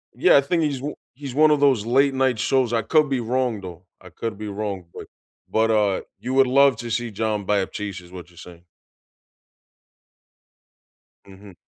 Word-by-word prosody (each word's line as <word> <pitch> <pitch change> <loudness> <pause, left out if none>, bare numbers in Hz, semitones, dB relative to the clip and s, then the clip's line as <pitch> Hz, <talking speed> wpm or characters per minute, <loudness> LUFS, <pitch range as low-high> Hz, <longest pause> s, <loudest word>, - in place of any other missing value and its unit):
Yeah, - - +5
I - - +5
think 165 +4 0
he's 140 -4 -2
o 150 - -4 0.2
he's 135 0 -8
one 155 +1 +5
of 150 - +3
those 130 -7 +3
late-night 130 -1 +2
shows, 130 -3 +1
I 115 - +2
could 155 +4 +2
be 135 - 0
wrong, 120 -2 -1
though, 90 -1 -10 0.2
I 95 - -13
could 110 +4 -6
be 105 - -6
wrong, 100 -3 -5
but - - -10 0.4
but, 110 0 +1
uh, 105 -3 +1 0.2
you 130 +1 -4
would 135 -1 +4
love 140 +1 +4
to 120 0 -7
see 115 0 -2
John 105 -1 -2
Batiste 100 -1 -2
is 90 - -17
what 90 -2 -10
you're - - -22
saying. 85 0 -13 2.6
Mhm. 100 0 -14
115 Hz, 180 wpm, -22 LUFS, 100-135 Hz, 2.6 s, Yeah